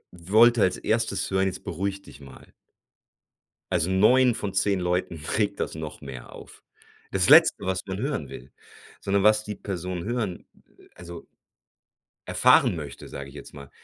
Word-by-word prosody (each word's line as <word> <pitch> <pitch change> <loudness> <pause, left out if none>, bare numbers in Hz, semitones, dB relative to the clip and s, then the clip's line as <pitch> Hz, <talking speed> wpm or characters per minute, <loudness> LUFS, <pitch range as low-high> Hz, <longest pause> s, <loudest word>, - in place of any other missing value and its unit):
wollte 110 +7 +4
als 90 - +2
1. 115 -3 -1
hören: 95 0 +1
„Jetzt 95 - -6
beruhig 100 +3 -4
dich 70 - -15
mal!“ 70 - -15 1.2
Also 90 -1 0
9 120 +6 +4
von 100 -2 -4
10 100 0 +1
Leuten 90 -1 -1 0.2
regt 105 -2 -1
das - - -3
noch 80 -1 -8
mehr 65 -4 -10
auf. - - -14 0.5
Das 90 -2 +1
Letzte, - - +6
was 95 0 -1
man 95 0 -5
hören 135 - -3
will, 60 - -11 0.5
sondern 100 0 0
was 110 0 +4
die 105 -1 -6
Person 90 -3 -5
hören, 110 -5 -4 0.5
also 85 -1 -11 1.0
erfahren - - +4
möchte, 75 -3 -8
sage 70 0 -8
ich - - -16
jetzt - - -11
mal, 70 -1 -11
95 Hz, 155 wpm, -25 LUFS, 85-105 Hz, 1.2 s, Letzte